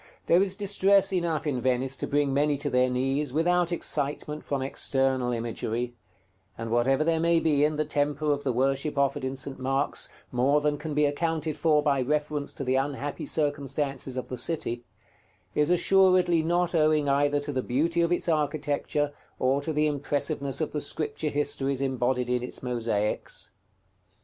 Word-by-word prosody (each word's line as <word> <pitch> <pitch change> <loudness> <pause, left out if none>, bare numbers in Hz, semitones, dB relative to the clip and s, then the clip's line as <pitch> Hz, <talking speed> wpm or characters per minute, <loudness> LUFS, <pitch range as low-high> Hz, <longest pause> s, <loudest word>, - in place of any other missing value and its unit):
There 175 +2 +5
is 195 -1 0
distress 200 -1 +3
enough 170 -4 0
in 135 -5 -1
Venice 130 +1 0
to - - -3
bring 145 -1 +1
many 145 +1 +2
to 145 - -3
their 125 0 +3
knees, 135 +3 0
without 175 +2 +2
excitement 150 -2 -2
from 140 -2 -2
external 135 -2 0
imagery; 120 +1 -3 0.6
and 115 0 -5
whatever 130 +5 +2
there 165 0 +1
may 170 0 +3
be 150 -3 +2
in 150 +1 +2
the 155 0 0
temper 150 0 0
of 145 0 -1
the 135 - 0
worship 135 +4 0
offered 140 0 +1
in 130 +1 -2
St. 135 +1 -4
Mark's 135 +2 -1 0.2
more 130 +4 +3
than 150 0 0
can 150 -1 -5
be 150 0 +4
accounted 160 +1 -1
for 150 -2 +2
by 140 -3 +2
reference 150 +1 -1
to - - -5
the 130 0 0
unhappy 140 +1 -3
circumstances 140 -3 -2
of 130 - -4
the 125 - -5
city, 120 -4 -2 0.7
is 150 +1 +2
assuredly 180 -1 +4
not 175 +2 0
owing 155 -2 +3
either 145 +1 +2
to 145 0 -4
the 130 -2 -1
beauty 160 +8 0
of 170 0 +1
its 175 - 0
architecture 145 -1 0 0.2
or 135 +2 +1
to 160 - -3
the 150 0 +1
impressiveness 145 -1 -1
of 155 - -1
the 150 - -2
Scripture 155 0 -2
histories 140 -2 -1
embodied 130 -2 0
in 125 0 0
its 125 - -4
mosaics. 115 -4 -2
145 Hz, 175 wpm, -27 LUFS, 135-155 Hz, 0.7 s, There